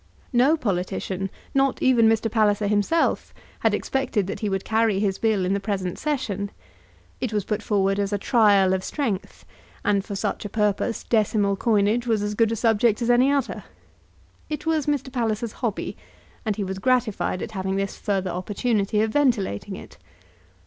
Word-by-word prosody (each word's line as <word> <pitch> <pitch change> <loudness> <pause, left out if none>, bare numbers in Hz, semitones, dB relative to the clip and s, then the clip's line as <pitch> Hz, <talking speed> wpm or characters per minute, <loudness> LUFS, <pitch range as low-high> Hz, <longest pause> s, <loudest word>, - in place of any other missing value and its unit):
No 265 +7 +4
politician, 195 - -2 0.2
not 270 -1 +2
even 235 -4 +4
Mr. 225 0 +2
Palliser 210 -2 +2
himself, 210 +11 +1 0.2
had - - +2
expected 250 -7 -1
that 195 - -5
he 210 - -1
would 195 -1 -2
carry 220 -3 +2
his 195 -2 0
Bill 215 -5 +1
in 185 - +1
the 200 - 0
present 195 -3 -3
session. 210 -10 -2 0.7
It 250 - -2
was 210 -3 -1
brought 210 0 -2
forward 195 -2 +1
as 200 0 -1
a 205 - +1
trial 200 -4 +4
of 190 0 -1
strength; 225 -9 -3 0.4
and 200 -1 +2
for 200 0 -6
such - - -2
a 205 - -5
purpose 210 +2 0
decimal 210 -3 +1
coinage 220 +3 +1
was 220 -3 +1
as 205 0 -2
good 225 +1 +2
a - - 0
subject 225 -1 +2
as 240 - +3
any 250 +3 +4
other. 280 -3 -1 0.9
It 300 0 -4
was 315 -3 0
Mr. 275 -3 -1
Palliser's 230 -2 -1
hobby, 230 -5 -2 0.5
and 215 - +1
he 205 - -2
was 190 0 -4
gratified 245 -6 0
at - - -6
having 190 -2 -2
this 195 0 -2
further 195 -3 -1
opportunity 205 +3 0
of 220 - -1
ventilating 210 - 0
it. - - -12
210 Hz, 175 wpm, -24 LUFS, 195-240 Hz, 0.9 s, No